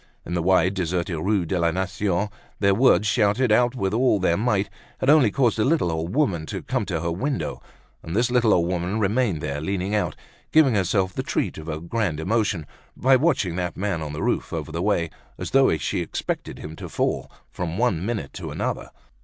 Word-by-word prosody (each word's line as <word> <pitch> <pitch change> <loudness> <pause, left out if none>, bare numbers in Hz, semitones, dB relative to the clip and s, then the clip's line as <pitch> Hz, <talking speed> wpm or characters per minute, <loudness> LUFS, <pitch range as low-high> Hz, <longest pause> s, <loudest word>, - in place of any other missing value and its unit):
In 85 - -5
the 85 - 0
wide, 90 +1 +3
deserted 90 -2 -2
Rue 95 +1 +1
de 90 +2 -1
la 85 0 +3
Nation, 95 +2 -1 0.3
their 100 -1 +4
words, 110 -1 +4
shouted 110 +2 +2
out 120 +3 +3
with 95 -5 -1
all 120 -1 +3
their 85 -2 +2
might, 105 -1 +1 0.3
had 135 - +3
only 150 -7 +6
caused 120 0 +1
a - - +4
little 140 - +2
old 80 +5 -3
woman 95 - +1
to - - -5
come - - -2
to 80 -2 -2
her 85 +1 -1
window; 130 - -2 0.4
and 80 - -6
this 120 +2 +2
little 120 -3 +3
old 85 -3 +3
woman 90 +3 -1
remained 105 -5 +1
there 75 -1 -3
leaning 95 +4 -2
out, 105 - 0 0.4
giving 155 -5 +5
herself 95 -1 +1
the - - -2
treat - - -2
of 80 +1 -8
a 75 -1 -3
grand 85 -2 -2
emotion 95 -2 0 0.3
by 130 +2 +5
watching 130 - +1
that 90 -2 -3
man 95 -4 -1
on 75 -1 -4
the 75 - -4
roof - - -1
over - - -4
the 85 +2 -3
way, 90 -5 +1 0.3
as - - -5
though 135 -11 +4
she 70 - -2
expected - - -4
to - - -10
see - - -5 0.2
him - - -6
fall, - - -1 0.2
from 85 -1 -4
one 110 -8 +1
minute 105 - -3
to - - -6
another. - - -3
95 Hz, 210 wpm, -24 LUFS, 85-115 Hz, 0.4 s, only